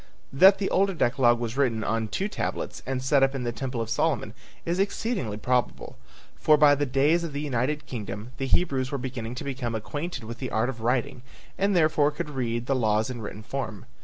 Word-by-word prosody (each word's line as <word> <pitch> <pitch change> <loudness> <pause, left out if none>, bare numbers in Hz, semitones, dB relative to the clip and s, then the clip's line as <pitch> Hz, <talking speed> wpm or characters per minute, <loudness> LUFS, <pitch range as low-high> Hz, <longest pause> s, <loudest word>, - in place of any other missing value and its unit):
That 190 +8 +7
the 195 0 -2
older 195 0 +2
decalogue 120 -4 +3
was 120 0 -3
written 120 -6 +1
on 115 0 -1
two 190 - -2
tablets 210 - -4
and 130 -1 -2
set 140 +1 +3
up 135 +1 +3
in 130 - -3
the 120 - -1
temple 125 0 -4
of 115 - -3
Solomon - - 0 0.3
is 175 +2 -1
exceedingly 195 - -1
probable, 125 +3 -1 0.4
for 155 - +4
by 150 -1 +6
the 145 0 0
days 145 +6 +3
of 165 -4 -5
the 145 - -3
United 145 +1 -1
Kingdom 105 -1 -6
the 135 -1 -2
Hebrews 135 -5 +1
were 140 - -1
beginning 125 -2 -5
to - - -5
become 130 -4 -3
acquainted 145 +5 -4
with 115 +2 -7
the 130 - -4
art 110 +3 0
of 120 -3 -6
writing 125 +2 0 0.3
and 200 0 +1
therefore 155 -3 +4
could 150 0 -5
read 120 -3 -2
the 135 - +1
laws 110 -1 +1
in 120 -2 -6
written 105 0 -7
form. 115 -5 -5
130 Hz, 210 wpm, -26 LUFS, 120-150 Hz, 0.4 s, That